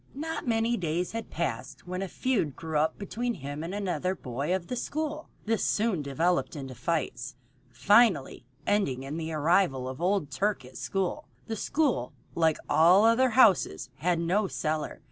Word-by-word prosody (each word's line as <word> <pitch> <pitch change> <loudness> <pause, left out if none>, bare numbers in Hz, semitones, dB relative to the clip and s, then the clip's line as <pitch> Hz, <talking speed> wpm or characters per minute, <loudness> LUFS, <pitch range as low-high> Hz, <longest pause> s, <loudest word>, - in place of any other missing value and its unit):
Not 320 0 -4
many 230 +1 +1
days 175 0 -1
had 225 0 -5
passed 170 +1 -4
when 180 +1 -4
a 195 - -2
feud 195 - -1
grew 160 -2 -2
up 155 +1 +1
between 235 +4 -3
him 145 +1 -6
and 170 - -4
another 190 -2 -1
boy 135 +1 -4
of 185 -2 -4
the 250 - -4
school. 310 +4 -3 0.2
This 225 +1 0
soon 210 -6 +1
developed 160 +6 0
into 135 -3 -6
fights, 125 -2 -2 0.3
finally 190 - +3 0.2
ending 140 -11 +1
in 140 +4 -5
the 165 0 -4
arrival 155 -4 +2
of 130 +4 -6
old 180 -5 +1
Turk 195 -1 -1
at 125 - -12
the - - -11
school. 195 +10 -2 0.2
The 225 - -3
school, 260 - 0 0.2
like 160 -2 +2
all 175 +7 +6
other 240 +3 +4
houses, 185 - +4
had 175 +1 +1
no 185 +5 +1
cellar. 155 -3 -3
175 Hz, 170 wpm, -28 LUFS, 150-215 Hz, 0.3 s, all